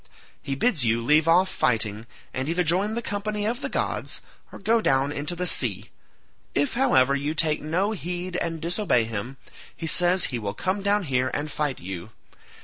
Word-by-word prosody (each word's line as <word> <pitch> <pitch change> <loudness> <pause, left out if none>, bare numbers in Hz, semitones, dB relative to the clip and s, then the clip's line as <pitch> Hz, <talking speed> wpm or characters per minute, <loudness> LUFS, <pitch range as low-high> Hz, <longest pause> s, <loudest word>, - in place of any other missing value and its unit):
He 135 - -3
bids 170 - +1
you 115 0 +2
leave 150 +7 +3
off 180 +3 +5
fighting, 110 - 0 0.3
and 130 +3 -2
either 175 +2 +1
join 190 +6 +1
the 235 - -3
company 210 0 -3
of 240 +5 -2
the - - -3
gods - - -2 0.3
or - - -9
go 225 +3 +2
down 135 -4 +2
into 145 +4 -2
the 180 +1 -2
sea; - - +1 0.6
if, 285 - +1
however, 140 - +3
you 145 +3 -2
take 155 -2 +2
no 180 +7 0
heed 180 -2 -4
and 165 -2 -2
disobey 170 - +1
him, 115 +4 -5 0.4
he 165 - -5
says 180 +3 +4
he 120 - -1
will 100 -1 -4
come 190 - -1
down 200 +1 +2
here 130 -4 0
and 150 +1 -3
fight 145 -3 -2
you. 90 +2 -7
160 Hz, 185 wpm, -25 LUFS, 130-190 Hz, 0.6 s, off